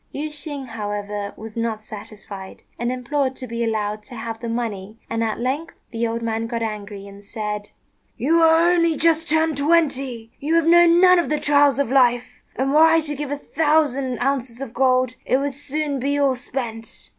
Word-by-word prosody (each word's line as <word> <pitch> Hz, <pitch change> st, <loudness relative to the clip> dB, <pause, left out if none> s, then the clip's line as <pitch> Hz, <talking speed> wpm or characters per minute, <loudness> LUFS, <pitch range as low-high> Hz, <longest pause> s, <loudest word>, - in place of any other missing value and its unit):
Yüeh 300 Hz, +2 st, -4 dB
shêng, 285 Hz, -3 st, -7 dB
however, 205 Hz, -2 st, -4 dB
was 220 Hz, 0 st, -9 dB
not 230 Hz, -2 st, -2 dB
satisfied, 205 Hz, -2 st, -10 dB, 0.2 s
and 240 Hz, +1 st, -1 dB
implored 260 Hz, +1 st, -1 dB
to 255 Hz, -, -7 dB
be 235 Hz, -1 st, -3 dB
allowed 215 Hz, -2 st, -1 dB
to 225 Hz, +4 st, -12 dB
have 225 Hz, 0 st, -5 dB
the 235 Hz, -, -5 dB
money; 220 Hz, -3 st, -4 dB
and 230 Hz, 0 st, 0 dB
at 220 Hz, -1 st, -2 dB
length 270 Hz, +7 st, -2 dB, 0.2 s
the 230 Hz, 0 st, -1 dB
old 230 Hz, +1 st, -3 dB
man 225 Hz, 0 st, -2 dB
got 230 Hz, -1 st, -3 dB
angry 205 Hz, -2 st, -5 dB
and 200 Hz, 0 st, -12 dB
said, 210 Hz, -1 st, -5 dB, 0.5 s
"You 325 Hz, +6 st, +2 dB
are 325 Hz, +1 st, +5 dB
only 335 Hz, -3 st, +2 dB
just 330 Hz, +1 st, +2 dB
turned 315 Hz, -1 st, +2 dB
twenty; 275 Hz, -7 st, +1 dB
you 310 Hz, +4 st, 0 dB
have 335 Hz, -1 st, +3 dB
known 345 Hz, +1 st, +6 dB
none 365 Hz, -1 st, +7 dB
of 320 Hz, -7 st, -1 dB
the 300 Hz, -, 0 dB
trials 285 Hz, -1 st, +4 dB
of 280 Hz, -3 st, 0 dB
life, 250 Hz, -2 st, +2 dB
and 270 Hz, +2 st, 0 dB
were 300 Hz, -, +4 dB
I 325 Hz, 0 st, +4 dB
to 300 Hz, -1 st, -3 dB
give 290 Hz, 0 st, -4 dB
a 285 Hz, -, -2 dB
thousand 285 Hz, -5 st, +1 dB
ounces 260 Hz, -3 st, -1 dB
of 270 Hz, -4 st, -6 dB
gold, 255 Hz, 0 st, +2 dB
it 255 Hz, -, +2 dB
would 280 Hz, +1 st, -1 dB
soon 290 Hz, 0 st, -3 dB
be 285 Hz, +3 st, 0 dB
all 280 Hz, -2 st, +3 dB
spent. 240 Hz, -3 st, -6 dB
255 Hz, 195 wpm, -22 LUFS, 225-295 Hz, 0.5 s, none